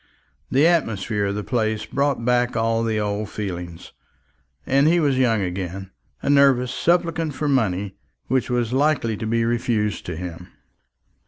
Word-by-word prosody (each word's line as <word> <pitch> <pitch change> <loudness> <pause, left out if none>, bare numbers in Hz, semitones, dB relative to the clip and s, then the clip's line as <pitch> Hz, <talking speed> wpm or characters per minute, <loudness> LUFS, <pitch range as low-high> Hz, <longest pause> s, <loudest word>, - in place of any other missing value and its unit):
The 140 +4 +3
atmosphere 115 - +1
of 100 - -2
the 105 - -3
place 110 -3 -1
brought 140 -4 -1
back 125 -1 +1
all 115 0 +1
the 110 -1 0
old 105 0 -2
feelings, 90 -5 -6 0.7
and 140 +2 +3
he 170 +2 +4
was 140 -5 +1
young 115 -5 +2
again, 95 +1 -5 0.3
a - - -1
nervous 135 -3 +4
supplicant 165 -1 0
for 150 - -2
money, 100 -8 0 0.3
which 130 -1 0
was 120 -1 0
likely 140 -5 +1
to 110 - -4
be 115 +1 +1
refused 115 -3 -1
to 85 - -4
him. 90 0 -7
115 Hz, 155 wpm, -22 LUFS, 105-135 Hz, 0.7 s, he